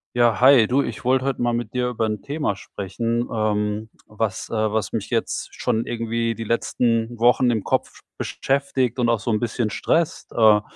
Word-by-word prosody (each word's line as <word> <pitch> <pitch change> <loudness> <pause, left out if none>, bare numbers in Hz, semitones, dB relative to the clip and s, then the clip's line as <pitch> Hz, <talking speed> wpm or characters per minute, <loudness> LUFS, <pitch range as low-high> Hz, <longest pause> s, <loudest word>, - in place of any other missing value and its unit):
Ja, 120 -2 +3
hi. 130 -3 +7
Du, 135 +4 +2
ich 115 - -6
wollte 130 +1 +2
heute 135 -2 -1
mal 120 0 +1
mit 120 -2 -4
dir 125 -1 0
über 115 -2 -1
'n 105 -2 -3
Thema 145 -7 -2
sprechen, 115 +5 -3
ähm, 105 0 -1 0.2
was 105 -2 -3
äh, - - -5
was 110 -1 0
mich - - -3
jetzt - - -1
schon 110 +1 0
irgendwie 115 0 -1
die 115 - -5
letzten 115 +1 0
Wochen 120 +2 +4
im 110 -4 0
Kopf - - -2 0.2
beschäftigt 135 -3 -1
und 120 -1 +2
auch 115 -2 +2
so 110 +4 -2
'n 105 - +1
bisschen 115 -1 -1
stresst. 170 - -1
Äh, 110 -2 +5
115 Hz, 190 wpm, -22 LUFS, 110-125 Hz, 0.2 s, hi